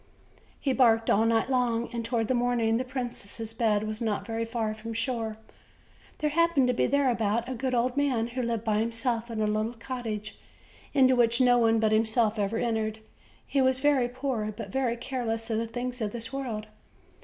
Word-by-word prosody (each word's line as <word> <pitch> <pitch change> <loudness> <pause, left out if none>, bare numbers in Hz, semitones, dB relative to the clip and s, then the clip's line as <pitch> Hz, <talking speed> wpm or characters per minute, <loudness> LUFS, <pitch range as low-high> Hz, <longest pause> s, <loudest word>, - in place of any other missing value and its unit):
He 270 - 0
barked 225 -3 +4
all 220 +3 +4
night 225 +1 +2
long, 245 -3 +1
and 235 -1 -2
toward 230 -1 -1
the 255 - +1
morning 240 -2 +2
the 250 - -1
princess' 240 -4 -5
bed 215 -3 +1
was 215 +1 -4
not 215 -3 -1
very 230 0 -2
far 225 -2 -2
from 225 +1 -7
the - - -8
shore. 230 -3 -2 0.8
There 300 -1 0
happened 335 -4 +3
to - - +3
be - - +1
thereabout 235 -4 +1
a 260 - -3
good 255 +1 -1
old 245 +1 +1
man, 260 -5 +1
who 250 +2 -3
lived 230 -2 -2
by 215 -2 +1
himself 230 +1 -1
in 225 -2 -4
a 215 - +2
little 215 +2 0
cottage, 225 -2 -5 0.6
into 260 -2 +5
which 235 -1 +3
no 245 -1 +5
one 225 -1 +4
but 220 -1 +2
him 220 +1 +4
self 220 -1 +1
ever 205 +2 0
entered; 220 -2 -1 0.5
he 275 - +1
was 260 0 +3
very 270 -3 +3
poor, 250 -4 -2
but 215 +2 -7
very 250 -3 0
careless 230 -2 -3
of 220 - +1
the 230 - -2
things 245 +2 -4
of 210 -2 -2
this 230 +1 -6
world. 240 -6 -3
230 Hz, 200 wpm, -28 LUFS, 225-255 Hz, 0.8 s, into